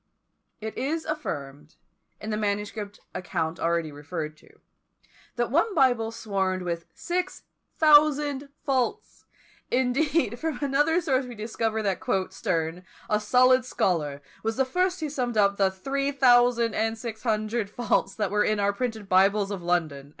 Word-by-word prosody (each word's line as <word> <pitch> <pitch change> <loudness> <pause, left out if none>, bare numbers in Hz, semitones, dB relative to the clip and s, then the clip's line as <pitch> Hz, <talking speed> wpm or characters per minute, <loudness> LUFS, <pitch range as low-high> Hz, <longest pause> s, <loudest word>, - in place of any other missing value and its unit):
It 220 0 -5
is 315 +5 -2
affirmed, 150 - -5 0.4
in 215 - -5
the - - 0
manuscript 205 0 -3
account 170 -3 -3
already 165 -2 0
referred 150 +1 -5
to, - - -22 0.8
that 240 0 -1
one 360 - +2
Bible 245 -6 +3
swarmed 190 -4 -2
with 170 -1 -3
six 360 +1 -3 0.3
thousand 295 -2 +4 0.2
faults! 260 -3 -1 0.4
Indeed, 260 0 +1
from 320 -1 -2
another 295 +5 +2
source 270 -5 +1
we 245 - -8
discover 220 0 -2
that 195 -3 0 0.3
"Sterne, 165 +1 -2 0.3
a 210 - +3
solid 255 +4 +4
scholar, 155 - -1 0.2
was 225 0 -2
the 265 - +3
first 365 +6 0
who 310 - -2
summed 245 -5 -2
up 200 -1 +3
the 195 -1 +3
three 275 +9 -2
thousand 245 -4 +4
and 225 +1 0
six 220 -1 -6
hundred 215 -1 -1
faults 210 -4 0
that 210 - -1
were 210 0 +3
in 215 -1 +1
our 200 0 +2
printed 220 -2 -3
Bibles 195 +2 +3
of 195 -3 -4
London." 160 -6 -1
220 Hz, 150 wpm, -26 LUFS, 190-265 Hz, 0.8 s, thousand